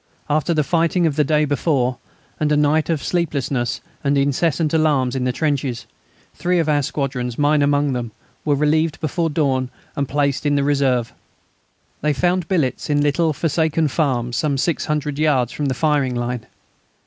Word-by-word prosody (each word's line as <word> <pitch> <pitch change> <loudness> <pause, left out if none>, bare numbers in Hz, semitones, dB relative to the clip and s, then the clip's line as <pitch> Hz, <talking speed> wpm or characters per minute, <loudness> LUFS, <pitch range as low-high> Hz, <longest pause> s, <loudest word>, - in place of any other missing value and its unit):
After 155 +2 +1
the 155 -2 +2
fighting 170 +3 +1
of 155 -3 +1
the 150 - +3
day 150 +1 +2
before, 135 -4 0 0.4
and 150 -1 +1
a 150 - +3
night 150 +2 +2
of 160 -4 0
sleeplessness 140 -8 -1 0.2
and 140 0 +2
incessant 150 +3 +1
alarms 145 -5 +2
in 130 -1 -1
the 125 - +1
trenches, 135 -4 -2 0.5
three 180 0 0
of 165 -2 +1
our 150 -1 +2
squadrons, 130 -4 -3
mine 145 0 +3
among 145 -1 +2
them, 120 -2 -3 0.3
were 145 -2 +2
relieved 155 +2 +1
before 165 +2 -1
dawn 135 -4 0 0.3
and 140 -2 -2
placed 140 -1 0
in 145 -1 +1
reserve. 140 -4 +1 0.9
They 150 0 +1
found 175 +3 0
billets 155 -10 -1
in 145 -1 +2
little 150 +3 +2
forsaken 160 0 0
farms 125 -6 0
some 140 0 0
600 150 -1 -1
yards 135 -6 +2
from 145 - -2
the 130 - -1
firing 145 -3 +1
line. 120 -1 -3
145 Hz, 165 wpm, -20 LUFS, 135-155 Hz, 0.9 s, the